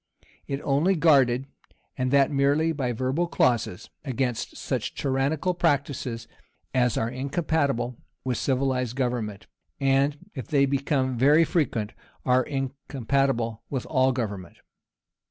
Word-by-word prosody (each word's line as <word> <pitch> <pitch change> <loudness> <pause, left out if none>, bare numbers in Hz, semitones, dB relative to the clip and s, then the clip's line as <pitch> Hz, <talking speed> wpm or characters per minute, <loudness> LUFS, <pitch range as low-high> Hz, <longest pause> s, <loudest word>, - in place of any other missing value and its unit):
It 140 0 -3
only 150 +8 +2
guarded, 135 -6 +4 0.5
and 130 -1 -1
that 140 +1 +4
merely 145 +3 +2
by 135 -6 -1
verbal 130 +8 0
clauses, 120 - 0
against 130 -4 -2
such - - -3
tyrannical 140 +6 0
practices 140 -8 -1 0.5
as 125 -2 +2
are 110 - +1
incompatible 135 -2 -1 0.3
with 125 -3 -1
civilized 130 -2 0
government, 120 -6 -2 0.3
and, 135 +1 +2 0.2
if 130 - -6
they 140 -3 +3
become 135 -2 0
very 145 +5 +6
frequent, 120 -12 -1 0.3
are 125 0 +4
incompatible 135 -3 -1
with 130 -3 -3
all 130 -2 +2
government. 100 -8 -4
135 Hz, 120 wpm, -26 LUFS, 125-140 Hz, 0.5 s, very